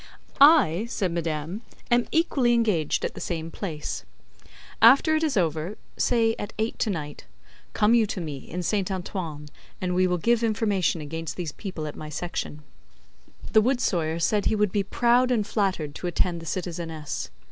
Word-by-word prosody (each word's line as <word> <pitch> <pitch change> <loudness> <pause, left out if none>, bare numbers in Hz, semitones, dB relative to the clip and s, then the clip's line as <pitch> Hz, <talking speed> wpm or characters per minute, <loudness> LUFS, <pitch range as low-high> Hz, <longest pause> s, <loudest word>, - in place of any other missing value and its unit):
"I," 260 - +6
said 190 -6 -1
madame, 165 +3 -3 0.3
"am 240 0 +3
equally 275 -7 +2
engaged 210 -10 +1
at - - -3
the - - -8
same 165 -1 -4
place. 160 -7 -5 0.8
After 275 +7 +7
it 310 - +1
is 300 -8 +1
over 165 +3 -1 0.2
say 230 -2 +2
at 205 - -5
eight 220 +2 -2
to 220 - +1
night 150 -6 -5 0.5
come 210 +2 +3
you 230 -2 +4
to 195 - -4
me, 155 -5 -4
in 180 0 -4
Saint 200 +1 0
Antoine, 175 -5 -5 0.3
and 180 -1 -1
we 185 +1 +3
will 180 0 +1
give 235 +6 +2
information 205 -7 +1
against 160 +2 -5
these 170 -4 -4
people 180 -3 -6
at 150 - -6
my 155 - -7
Section." 150 -1 -5 0.9
The 220 - +7
wood 250 +3 +1
sawyer 165 -7 0
said 200 +5 +1
he 220 - +2
would 210 -2 +1
be 205 - +1
proud 240 +5 +2
and 230 -5 +1
flattered 190 -8 -1
to 180 - -5
attend 175 0 0
the 165 - -9
citizeness. 165 -4 -4
185 Hz, 175 wpm, -25 LUFS, 165-225 Hz, 0.9 s, After